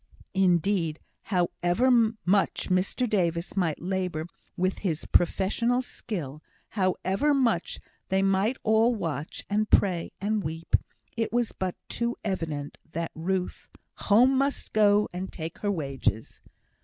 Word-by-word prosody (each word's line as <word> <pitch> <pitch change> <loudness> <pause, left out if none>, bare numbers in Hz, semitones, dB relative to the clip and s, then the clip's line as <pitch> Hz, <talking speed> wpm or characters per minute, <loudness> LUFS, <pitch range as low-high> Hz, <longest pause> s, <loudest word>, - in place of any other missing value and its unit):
Indeed, 180 -3 +2 0.3
however 180 +5 +1 0.3
much 195 +2 +1
Mr 190 +7 +1
Davis 175 -4 0
might 175 -6 0
labour 180 -3 -2 0.3
with 185 +1 0
all - - -12
his 170 -6 -2
professional 230 +8 +2
skill 155 - -6 0.3
however 195 +8 +1
much 230 -10 +1 0.3
they 190 0 +2
might 195 +6 +2
all 225 +2 +4
watch 155 - -4
and 210 +1 0
pray 180 -4 +2
and 210 +1 0
weep 165 +2 -1 0.4
it 225 -1 -1
was 240 -1 +1
but 185 -1 -3
too 235 0 -1
evident 160 -7 -3
that 165 0 -3
Ruth 180 +3 -3 0.3
"home 245 +6 +4
must 275 +1 -1
go, 210 -1 +4
and 185 +2 -5
take 160 0 -7
her 205 - -1
wages." 135 - -2
190 Hz, 130 wpm, -27 LUFS, 170-215 Hz, 0.4 s, all